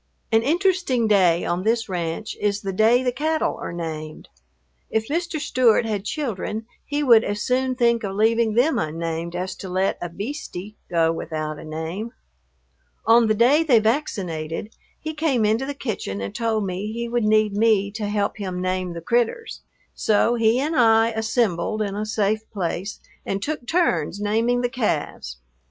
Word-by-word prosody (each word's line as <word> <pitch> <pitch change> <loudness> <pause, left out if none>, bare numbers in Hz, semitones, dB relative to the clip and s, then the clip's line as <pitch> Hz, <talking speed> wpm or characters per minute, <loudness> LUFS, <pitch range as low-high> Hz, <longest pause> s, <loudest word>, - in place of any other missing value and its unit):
An 225 0 +4
interesting 330 - +1
day 180 -5 +4
on 175 +1 -1
this 225 +3 +1
ranch 175 +2 -3
is 205 0 0
the 195 -1 -3
day 225 +6 +4
the 250 - +1
cattle 310 +5 -1
are - - -4
named. 155 -2 -6 0.6
If 220 0 -1
Mr. 335 +1 -1
Stewart 245 -5 +3
had 210 -3 -2
children 220 -5 -3 0.2
he 295 0 -2
would 230 -5 +6
as 205 0 -2
soon 255 0 +1
think 235 -2 +2
of 195 -1 -3
leaving 225 +1 +2
them 270 +7 +3
unnamed 165 +2 -3
as 185 +1 -3
to 190 - -7
let 185 +2 0
a 175 - -3
"beastie" 205 - -6
go 165 -2 +2
without 155 -2 -4
a - - -9
name. 160 +9 -5 0.9
On 230 0 +6
the 215 - +2
day 250 +8 +5
they 290 -8 +4
vaccinated 205 - -2 0.2
he 315 0 -5
came 295 -8 +1
into 225 +5 +1
the 285 - -4
kitchen 210 - -4
and 100 0 -5
told 220 -3 0
me 190 +3 -3
he 235 +1 -3
would 240 0 0
need 215 -1 +3
me 205 -2 +2
to 210 0 -4
help 205 0 -1
him 185 -3 -4
name 185 -1 -2
the 170 - -6
"critters." 240 - -1 0.3
So 220 +2 +2
he 230 +1 +3
and 305 +4 -1
I 225 -3 +5
"assembled" 220 -3 0
in 200 -2 -3
a 210 +1 -3
safe 215 0 0
place 190 0 -3 0.2
and 195 - -2
took 275 +2 -4
turns 200 - +1
naming 225 +4 +1
the 245 - 0
calves. 165 - -2
215 Hz, 175 wpm, -23 LUFS, 185-240 Hz, 0.9 s, would